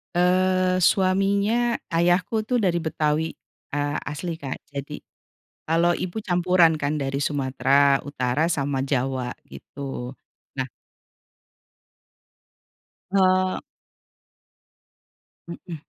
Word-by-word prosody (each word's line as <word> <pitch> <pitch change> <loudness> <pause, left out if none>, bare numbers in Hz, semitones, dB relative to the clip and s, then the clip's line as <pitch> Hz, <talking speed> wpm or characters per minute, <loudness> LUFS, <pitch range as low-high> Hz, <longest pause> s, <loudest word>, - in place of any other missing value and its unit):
Eee, 185 +1 +2
suaminya, 200 +5 +2
ayahku 175 +5 +1
tuh 245 +3 0
dari 175 -5 +1
Betawi, 155 0 0 0.4
eee, 145 0 -1
asli 165 +3 -4
Kak 140 -4 -6
jadi 145 +1 -6 0.7
kalau 170 +2 +3
ibu 185 +4 -4
campuran 175 -3 +3
kan 145 +1 0
dari 135 0 -2
Sumatera 140 0 +2
Utara 135 +1 0
sama 140 -5 -1
Jawa 130 -2 -1 0.2
gitu, 135 -2 -7 0.4
nah 130 -2 -3 2.4
Eee 185 -1 +3 1.9
Mhm, 170 0 -7
165 Hz, 85 wpm, -24 LUFS, 140-185 Hz, 2.4 s, kalau